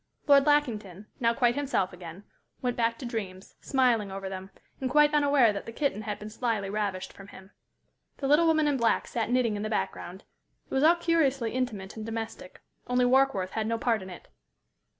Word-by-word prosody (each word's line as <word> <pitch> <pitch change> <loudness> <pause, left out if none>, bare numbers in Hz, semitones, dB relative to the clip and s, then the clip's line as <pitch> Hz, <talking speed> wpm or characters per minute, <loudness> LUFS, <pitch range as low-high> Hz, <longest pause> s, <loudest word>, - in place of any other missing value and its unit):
Lord 280 -1 +5
Lackington, 215 -10 0
now 230 -1 +2
quite 240 -1 +3
himself 275 -10 -1
again, 175 +1 -10 0.4
went 245 -1 -2
back 230 -1 0
to 260 - -8
dreams, 200 -5 -6
smiling 245 -7 +1
over 195 0 -5
them, 190 0 -7 0.3
and 260 - -2
quite 295 +2 +4
unaware 285 -6 +4
that 200 - -6
the - - -5
kitten 230 -4 -1
had 210 -1 -4
been 210 +1 -9
slyly 220 -4 -2
ravished 200 -3 -3
from 195 - -13
him. 190 0 -14 0.7
The 275 - -3
little 300 +4 +4
woman 315 -2 +3
in 285 -2 +1
black 235 -2 +1
sat 230 -2 -3
knitting 245 -3 +1
in 205 - -4
the 215 - -3
background. 190 -3 -4 0.4
It - - -12
was 265 - +2
all 330 +3 +6
curiously 280 -9 +1
intimate 220 -7 -3
and 220 - -5
domestic, 225 -4 -6 0.3
only 250 0 +2
Warkworth 250 -7 +2
had 220 -1 -2
no 230 0 0
part 225 -2 0
in 190 - -9
it. 180 - -11
230 Hz, 195 wpm, -28 LUFS, 200-270 Hz, 0.7 s, all